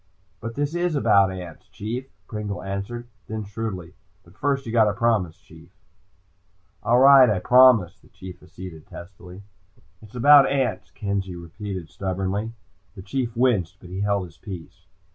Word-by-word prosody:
"But 115 Hz, +1 st, -6 dB
this 145 Hz, +2 st, -2 dB
is 175 Hz, -2 st, 0 dB
about 100 Hz, -8 st, +4 dB
ants, 90 Hz, -4 st, -9 dB
Chief," 120 Hz, +6 st, -5 dB, 0.2 s
Pringle 105 Hz, -5 st, -5 dB
answered. 100 Hz, +5 st, -5 dB, 0.2 s
Then 110 Hz, 0 st, -4 dB
shrewdly, 100 Hz, -4 st, -6 dB, 0.3 s
"But 85 Hz, -, -20 dB
first 135 Hz, +3 st, -1 dB
you 115 Hz, -, -5 dB
gotta 110 Hz, -3 st, +3 dB
promise, 110 Hz, -7 st, 0 dB
Chief." -, -, -17 dB, 1.1 s
"All 115 Hz, +3 st, +3 dB
right, 135 Hz, -1 st, +8 dB
I 105 Hz, -, +1 dB
promise," 125 Hz, -4 st, +5 dB
the -, -, -23 dB
Chief 95 Hz, -1 st, -11 dB
acceded 90 Hz, -3 st, -11 dB
testily. 90 Hz, +1 st, -12 dB, 0.6 s
"It's 110 Hz, +2 st, -15 dB
about 140 Hz, +3 st, +7 dB
ants," 115 Hz, -8 st, -1 dB
Kenzie 100 Hz, -3 st, -4 dB
repeated 90 Hz, +1 st, -7 dB
stubbornly. 95 Hz, +4 st, -3 dB, 0.4 s
The 95 Hz, -, -10 dB
Chief 120 Hz, +2 st, -3 dB
winced, 105 Hz, -8 st, +1 dB
but 90 Hz, -, -13 dB
he 95 Hz, -, -5 dB
held 100 Hz, -2 st, 0 dB
his 85 Hz, -2 st, -16 dB
peace. 90 Hz, -6 st, -10 dB
100 Hz, 150 wpm, -23 LUFS, 95-120 Hz, 1.1 s, right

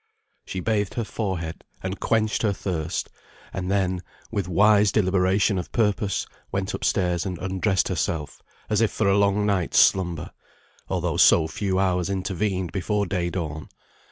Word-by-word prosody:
She 95 Hz, -, -4 dB
bathed 105 Hz, -1 st, 0 dB
her 120 Hz, -, -1 dB
forehead, 95 Hz, -6 st, -4 dB, 0.2 s
and 95 Hz, +1 st, -4 dB
quenched 110 Hz, -1 st, +1 dB
her 105 Hz, -3 st, +2 dB
thirst, 85 Hz, -4 st, -3 dB, 0.4 s
and 90 Hz, -1 st, -3 dB
then, 95 Hz, -2 st, 0 dB, 0.3 s
with 100 Hz, -5 st, -2 dB
wise 105 Hz, +3 st, +4 dB
deliberation 95 Hz, 0 st, +2 dB
of 90 Hz, -, -7 dB
purpose, 105 Hz, -2 st, 0 dB, 0.3 s
went 95 Hz, +1 st, -2 dB
upstairs, 90 Hz, -2 st, 0 dB
and 95 Hz, -3 st, -4 dB
undressed 95 Hz, +1 st, 0 dB
herself, 75 Hz, -3 st, -2 dB, 0.3 s
as 105 Hz, 0 st, +1 dB
if 115 Hz, -, +3 dB
for 110 Hz, -, 0 dB
a 100 Hz, -, +4 dB
long 100 Hz, 0 st, +2 dB
night's 100 Hz, -4 st, 0 dB
slumber, 90 Hz, -5 st, +3 dB, 0.6 s
although -, -, -1 dB
so 80 Hz, -2 st, +6 dB
few 95 Hz, +3 st, -2 dB
hours 90 Hz, -1 st, +1 dB
intervened 95 Hz, -1 st, -1 dB
before 100 Hz, +2 st, 0 dB
day 90 Hz, -2 st, -1 dB
dawn. 80 Hz, -4 st, -5 dB
95 Hz, 150 wpm, -24 LUFS, 90-105 Hz, 0.6 s, so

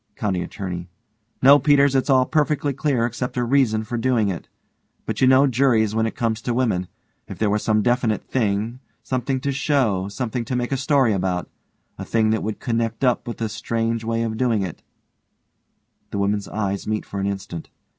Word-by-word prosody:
COUNTY 95 Hz, -5 st, -1 dB
ATTORNEY: 90 Hz, -1 st, -5 dB, 0.5 s
No, 140 Hz, +2 st, +8 dB
Peters, 140 Hz, 0 st, +4 dB
it's 135 Hz, +1 st, +1 dB
all 130 Hz, -1 st, +5 dB
perfectly 150 Hz, -1 st, +1 dB
clear 135 Hz, -4 st, 0 dB
except 125 Hz, +2 st, -4 dB
a 125 Hz, -, +1 dB
reason 120 Hz, -4 st, +2 dB
for 120 Hz, +2 st, -4 dB
doing 115 Hz, -4 st, +2 dB
it. 90 Hz, -, -5 dB, 0.6 s
But -, -, -3 dB
you 130 Hz, -, +6 dB
know 130 Hz, +2 st, +6 dB
juries 120 Hz, -5 st, +2 dB
when 110 Hz, 0 st, +1 dB
it -, -, -5 dB
comes 115 Hz, -1 st, -1 dB
to 120 Hz, 0 st, -2 dB
women. 110 Hz, -8 st, 0 dB, 0.4 s
If -, -, -8 dB
there 105 Hz, -2 st, +1 dB
was 105 Hz, 0 st, +1 dB
some 110 Hz, -2 st, +2 dB
definite 120 Hz, -3 st, +1 dB
thing. 110 Hz, 0 st, -1 dB, 0.2 s
Something 130 Hz, +1 st, -1 dB
to 140 Hz, -, -1 dB
show 130 Hz, -9 st, +1 dB
something 120 Hz, +3 st, -3 dB
to 125 Hz, -, -3 dB
make 120 Hz, +1 st, -2 dB
a -, -, +2 dB
story 135 Hz, -4 st, +3 dB
about 90 Hz, -2 st, -2 dB, 0.5 s
a -, -, -4 dB
thing 110 Hz, -1 st, +1 dB
that 110 Hz, -, 0 dB
would 110 Hz, 0 st, -4 dB
connect 115 Hz, 0 st, -2 dB
up 125 Hz, -2 st, +2 dB
with 120 Hz, -, -5 dB
this 110 Hz, -2 st, -3 dB
strange 115 Hz, 0 st, -2 dB
way 115 Hz, 0 st, -1 dB
of 110 Hz, -1 st, -3 dB
doing 115 Hz, -4 st, +1 dB
it 90 Hz, -4 st, -6 dB, 1.3 s
(_The -, -, -3 dB
women's 100 Hz, 0 st, 0 dB
eyes 100 Hz, -2 st, -3 dB
meet 110 Hz, 0 st, -1 dB
for 100 Hz, -, -5 dB
an 100 Hz, -, -1 dB
instant. 95 Hz, -4 st, -5 dB
115 Hz, 195 wpm, -22 LUFS, 105-130 Hz, 1.3 s, No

